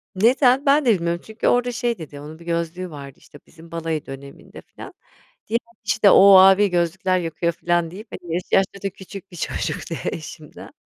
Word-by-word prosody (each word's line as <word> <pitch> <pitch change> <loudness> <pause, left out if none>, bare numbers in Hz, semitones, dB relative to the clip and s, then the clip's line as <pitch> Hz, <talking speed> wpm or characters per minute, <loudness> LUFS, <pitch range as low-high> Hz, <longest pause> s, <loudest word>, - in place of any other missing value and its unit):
Neden? 255 +6 +3
Ben 280 0 +3
de 235 - +5
bilmiyorum 170 -1 -2
çünkü 220 +1 -3
orada 245 0 +2
şey 235 -1 -2
dedi, 150 -3 -10
onun 155 +3 -11
bir 170 - -15
gözlüğü 170 +2 -3
vardı, 140 -3 -11
işte, 145 - -17
bizim 165 0 -17
balayı 165 -2 -3
döneminde 135 +1 -11
filan. - - -13 0.5
Diğer 230 +1 0 0.2
işte, 205 0 +3
"O, 195 0 +8
abi 195 +2 +6
gözlükler 180 +2 0
yakıyor" 170 0 -2
filan 170 -1 -1
deyip, 210 +5 -10
hani, 170 -2 -7
yaşı 175 +1 -2
yaşça 195 0 +1
da 195 - -1
küçük 190 +1 -12
bir - - -12
çocuktu 165 - -4 0.2
eşimden. 155 -1 -10
175 Hz, 180 wpm, -21 LUFS, 165-200 Hz, 0.5 s, O